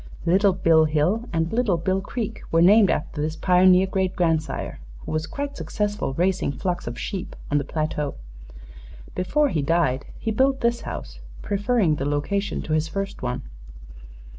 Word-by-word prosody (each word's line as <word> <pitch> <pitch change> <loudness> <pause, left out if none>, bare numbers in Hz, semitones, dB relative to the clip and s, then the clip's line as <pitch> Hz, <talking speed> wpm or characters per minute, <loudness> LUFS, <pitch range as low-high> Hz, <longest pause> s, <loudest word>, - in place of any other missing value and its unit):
Little 190 +3 +4
Bill 165 -3 +4
Hill 170 +11 0
and 165 0 -1
Little 225 -7 +2
Bill 190 +3 0
Creek 220 +2 -4
were 165 +1 +4
named 200 +2 +6
after 150 0 -2
this 155 +1 -2
pioneer 185 +2 +5
great 190 -1 -1
grandsire, 160 - -1 0.3
who - - -5
was 155 0 -1
quite 285 0 -5
successful 205 -9 -2
raising 180 -2 +1
flocks 175 +2 -3
of 120 0 -5
sheep 190 - -5 0.2
on 145 - +3
the - - -2
plateau. 150 -1 -2 1.0
Before 285 +12 +1
he 155 - 0
died 140 -3 +1
he 225 - -2
built 265 +4 +2
this 235 0 +1
house, - - -7 0.2
preferring 205 -5 +1
the 140 - -2
location 195 +8 -1
to 155 - -3
his 155 0 +1
first 195 +4 -4
one." 125 0 -3
180 Hz, 165 wpm, -24 LUFS, 155-205 Hz, 1.0 s, named